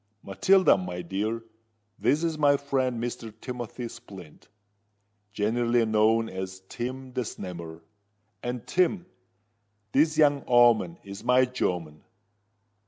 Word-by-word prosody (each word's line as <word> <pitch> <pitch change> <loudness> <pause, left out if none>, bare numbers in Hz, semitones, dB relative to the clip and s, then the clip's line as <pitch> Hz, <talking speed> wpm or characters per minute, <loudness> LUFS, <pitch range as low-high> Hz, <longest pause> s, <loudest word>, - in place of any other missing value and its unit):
Matilda, 185 - +4
my 90 -1 -5
dear, 105 +6 -2 0.6
this 150 +4 +2
is 165 -1 0
my 145 -2 +4
friend 130 -4 -1
Mr. 115 -1 -5
Timothy 120 -1 -6
Splint, 100 -9 -13 0.8
generally 115 +3 +1
knowed 110 +1 +3
as 95 0 -6
Tim 130 +1 -5
the 130 - -1
Snammer: 85 -7 -7 0.6
and 120 -1 -4
Tim, 180 0 +1 0.9
this 155 +2 +3
young 145 -3 +4
o'oman 120 -8 +4
is 100 0 -9
my 125 +1 +4
jomen. 90 -11 -3
120 Hz, 110 wpm, -27 LUFS, 100-130 Hz, 0.9 s, Matilda